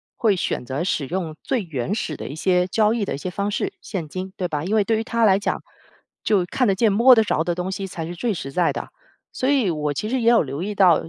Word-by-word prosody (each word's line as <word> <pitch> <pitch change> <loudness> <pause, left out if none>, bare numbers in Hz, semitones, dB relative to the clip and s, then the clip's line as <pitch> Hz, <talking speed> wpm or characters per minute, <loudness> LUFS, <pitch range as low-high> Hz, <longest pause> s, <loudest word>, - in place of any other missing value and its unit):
会 215 -4 +2
选 175 - -2
择 135 +6 -2
使 155 -6 -1
用 170 -2 -3
最 260 -4 0
原 160 -2 -3
始 185 -8 -3
的 - - -7
一 145 - -6
些 180 +2 +2
交 215 +3 +2
易 230 -3 -1
的 - - -3
一 - - -3
些 185 - -4
方 200 +3 -2
式， - - -2
现 180 -7 -5
金， 185 +4 -6
对 180 - -1
吧？ 150 -3 -3
因 195 +6 0
为 215 - +4
对 225 +2 +1
于 220 - -1
他 230 0 +1
来 195 -2 +5
讲， 200 - -2 0.6
就 200 -5 +2
看 250 +8 0
得 195 - +3
见、 215 +2 +2
摸 235 +6 +7
得 225 -2 +5
着 160 -6 0
的 175 +1 -1
东 180 +2 -3
西 195 0 -4
才 170 -3 -5
是 175 - -6
最 230 +4 -1
实 135 -6 -6
在 175 +3 +2
的。 - - -5 0.5
所 260 - 0
以 260 -10 +3
我 150 -2 -1
其 210 - -3
实 260 +1 0
也 230 - +4
有 235 -1 +5
留 140 +2 -5
意 205 +3 -3
到， 180 -5 +5
190 Hz, 300 characters per minute, -22 LUFS, 165-220 Hz, 0.6 s, 摸